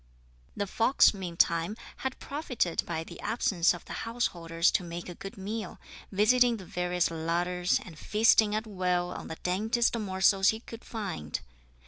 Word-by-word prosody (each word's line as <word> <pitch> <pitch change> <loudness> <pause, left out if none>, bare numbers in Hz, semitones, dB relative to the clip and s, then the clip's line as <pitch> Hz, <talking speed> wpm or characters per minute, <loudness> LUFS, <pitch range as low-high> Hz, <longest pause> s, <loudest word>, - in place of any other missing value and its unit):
The 205 - 0
fox, 225 +7 +4
meantime, 170 0 0 0.2
had 265 +1 -3
profited 255 - -2
by 165 -1 -2
the - - -11
absence 190 -7 +2
of 175 - -6
the - - -7
householders 175 -8 0
to - - +1
make 170 0 -6
a 175 - -6
good 195 +4 -9
meal, 205 0 -5 0.3
visiting 235 +4 +4
the 190 - -10
various 180 0 0
larders, 175 +2 0
and 160 -4 -11
feasting 215 -1 +4
at 215 +1 -1
will 180 -3 -1
on - - -7
the 160 - -6
daintiest 220 +7 +1
morsels 195 -1 +3
he 220 +1 -1
could 230 -1 -10
find. 195 - -4
190 Hz, 155 wpm, -29 LUFS, 175-220 Hz, 0.3 s, fox